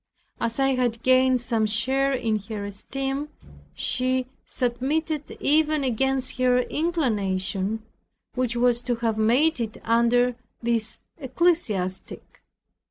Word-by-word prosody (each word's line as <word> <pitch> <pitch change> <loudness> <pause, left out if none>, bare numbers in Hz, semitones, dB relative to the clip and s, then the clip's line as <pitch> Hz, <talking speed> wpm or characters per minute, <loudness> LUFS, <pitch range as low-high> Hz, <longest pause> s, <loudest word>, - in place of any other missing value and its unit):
As 230 +2 -2
I 270 0 +3
had 240 -3 -1
gained 255 -1 +4
some 230 -3 0
share 265 +6 +1
in 225 -5 0
her 210 -2 -4
esteem, 270 +8 -4 0.5
she 255 0 0 0.2
submitted 285 +5 -1
even 305 0 +3
against 265 +1 0
her 250 -1 +4
inclination, 215 - -1 0.5
which 250 -2 -1
was 240 0 +2
to 245 0 -1
have 225 -2 -1
made 255 +8 +3
it 225 -2 -3
under 235 +2 +3 0.2
this 230 -2 -1 0.2
ecclesiastic. 255 - -1
245 Hz, 110 wpm, -25 LUFS, 225-270 Hz, 0.5 s, gained